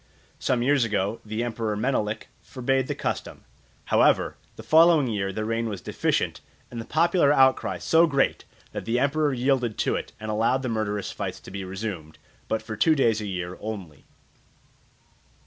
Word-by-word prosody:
Some 125 -2 +1
years 140 0 +3
ago 110 0 -1
the 110 +2 -3
emperor 115 -3 -2
Menelik 110 -2 -1
forbade 130 0 -1
the - - -2
custom. - - -4 0.4
However, - - +3 0.2
the - - -10
following 160 -2 +6
year 100 -5 -1
the 110 +2 -3
rain 115 +1 -1
was 100 -3 -5
deficient, - - -1 0.3
and 120 -1 -5
the - - -9
popular 170 -1 +3
outcry 130 -2 +3
so 165 +1 +4
great 140 -3 +1 0.3
that - - -6
the 115 +1 0
emperor 145 +3 +2
yielded 125 -3 0
to - - +1
it, - - -5
and 110 0 -4
allowed 115 +5 +1
the 130 - -2
murderous 105 -2 -2
fights - - -5
to - - -12
be 100 0 -5
resumed, 95 -5 -6 0.3
but 110 0 -1
for 110 -1 -6
two 155 +9 +4
days 115 -6 +2
a 105 - -4
year 90 -2 -5
only. 95 -9 -7
115 Hz, 170 wpm, -25 LUFS, 105-135 Hz, 0.4 s, following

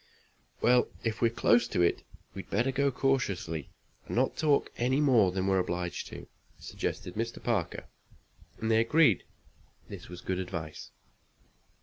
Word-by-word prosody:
"Well, 125 0 +4 0.2
if 110 -1 -2
we're 115 - +4
close 115 0 +3
to 90 - +1
it, 85 - +2 0.3
we'd 95 - -8
better 120 +6 +1
go 140 +1 +2
cautiously, 100 - -1 0.4
and - - -4
not - - +1
talk 150 -3 +2
any 130 +3 +1
more 120 -10 +4
than 95 0 -2
we're 95 -1 +2
obliged 90 -1 -3
to," - - -10 0.3
suggested - - -5
Mr. 115 +2 -4
Parker, 110 -8 -1 0.7
and 110 0 -1
they 110 - +5
agreed 120 - +4
that - - -31
this - - -9
was 90 0 -9
good 95 -1 -2
advice. 85 -4 -6
110 Hz, 150 wpm, -30 LUFS, 90-125 Hz, 0.7 s, they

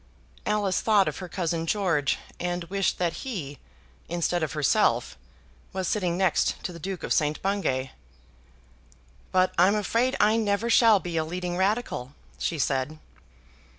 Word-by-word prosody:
Alice 205 -3 +1
thought 210 -4 +4
of 155 - -3
her 185 -2 -7
cousin 165 -2 -2
George, 165 -8 +1 0.2
and 175 0 -2
wished 195 -1 +1
that 175 -2 -1
he, 165 - -5 0.5
instead 175 +1 0
of 160 - -2
herself, 150 -3 +2 0.6
was 190 -1 -2
sitting 180 -5 0
next 190 -3 +2
to 180 - -4
the 170 - -9
Duke 190 +2 -5
of - - 0
St. 150 0 +1
Bungay. 160 -10 -1 1.4
"But 185 0 +3
I'm 190 +4 +5
afraid 230 +5 +1
I 215 +2 +4
never 215 +1 0
shall 225 -4 +6
be 175 -1 -4
a 160 - +2
leading 175 +2 -4
Radical," 190 - -1 0.2
she 165 - -1
said. 135 +2 -1
180 Hz, 150 wpm, -26 LUFS, 160-200 Hz, 1.4 s, shall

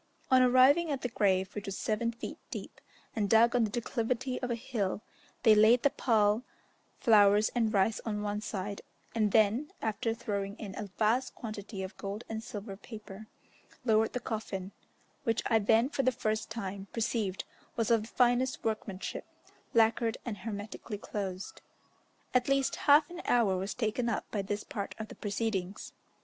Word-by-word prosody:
On 260 0 +7
arriving 255 +6 +5
at 275 -3 -2
the 250 - -1
grave, 190 -3 +1
which 205 -1 -6
was 195 0 -3
seven 230 +2 0
feet 235 - -7
deep, - - -7 0.3
and 205 -3 0
dug 230 +2 +5
on 240 -2 +4
the - - -3
declivity 245 +3 -2
of 250 - -2
a 235 - 0
hill, 220 -5 -2 0.4
they 220 -3 +8
laid 220 +3 +6
the 285 - +4
pall, 215 -2 +2 0.6
flowers, 210 -1 +5
and 230 -3 +1
rice 205 +1 +2
on 210 -2 -2
one 210 0 -2
side, 200 -1 -4 0.3
and 215 -3 +1
then, 220 +7 +3
after 225 +1 -1
throwing 200 -2 -3
in 200 -3 -7
a 205 -1 -5
vast 230 +4 +1
quantity 210 -3 -6
of 190 - -7
gold 200 +3 -5
and 220 0 -4
silver 205 -3 -7
paper, 215 0 -10 0.6
lowered 220 -1 +3
the 250 - -1
coffin, 205 -5 -4 0.5
which 230 -1 0
I 225 - +3
then 225 +3 +4
for 275 - -1
the 255 -1 +3
first 215 -2 -2
time 200 -3 -5
perceived 220 -4 -1 0.3
was 230 0 0
of 230 -2 +5
the 215 - -8
finest 250 +2 +2
workmanship, 215 -3 -3 0.5
lacquered 225 0 +3
and 215 -5 -4
hermetically 210 +1 -6
closed. 195 -2 -5 0.7
At 250 +1 +2
least 275 -1 +2
half 295 +1 +7
an 350 0 -7
hour 225 -6 +3
was 190 +2 -3
taken 235 +1 0
up 225 - -1
by 205 - -1
this 205 +1 -3
part 205 -9 -5
of 220 -1 -6
the - - -9
proceedings. 205 -2 -3
220 Hz, 170 wpm, -31 LUFS, 205-235 Hz, 0.7 s, they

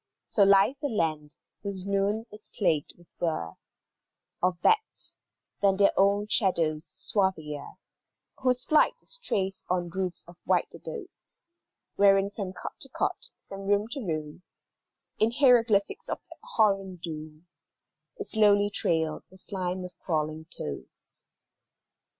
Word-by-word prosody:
So 210 - 0
lies 200 +7 +5
a 290 - 0
land 155 - -1 0.3
whose 195 -2 -3
noon 200 +3 0
is 210 0 -13
plagued 165 -7 0
with 175 - -19
whirr 120 - -1 0.9
Of 180 -1 +1
bats, 440 0 +1 0.5
than 195 -1 +4
their 200 0 +5
own 200 +1 +3
shadows 170 -7 +2
swarthier, 155 -4 -1 0.7
Whose 255 -1 +3
flight 310 +9 +4
is - - +1
traced 195 - -2
on 175 -1 0
roofs 185 -2 -2
of 175 0 -14
white - - +1
abodes, 420 -6 -8 0.5
Wherein 195 0 +5
from 200 -3 -4
court - - -8
to - - -1
court, - - -2 0.2
from 195 0 -7
room 205 +1 +2
to 270 +3 -4
room, 155 -3 -4 0.8
In 220 - +4
hieroglyphics 235 -6 +3
of - - -2
abhorrent 195 - 0
doom, 155 -1 -7 0.7
Is - - -7
slowly 205 -2 +4
trailed 160 -5 0
the 190 - -17
slime 185 -1 -3
of 180 - -10
crawling 155 -1 -2
toads. 75 - -8
195 Hz, 130 wpm, -28 LUFS, 170-210 Hz, 0.9 s, lies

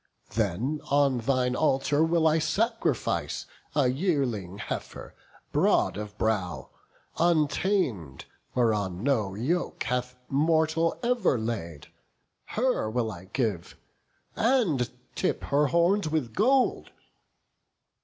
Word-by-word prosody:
Then 115 - -1
on 140 -3 +3
thine 125 +1 +1
altar 145 +1 +2
will 160 0 +3
I 160 +1 +3
sacrifice 225 +9 -1 0.3
A 145 -4 +4
yearling 125 - -1
heifer, 105 - -6 0.4
broad - - +2
of 105 0 -7
brow, 100 -6 -1 0.5
untam'd, 150 - +1 0.3
Whereon 105 -6 0
no 110 -8 +1
yoke 155 - -1
hath 125 0 -2
mortal 160 +3 +1
ever 235 - +2
laid: 100 -10 -5 0.6
Her 245 - 0
will 115 -1 -1
I 90 -2 -10
give, 100 -5 -3 0.6
and 210 - +2 0.2
tip - - -1
her 145 +1 +2
horns 170 +3 +2
with 145 -8 -1
gold." 255 +5 +2
135 Hz, 105 wpm, -27 LUFS, 110-165 Hz, 0.6 s, A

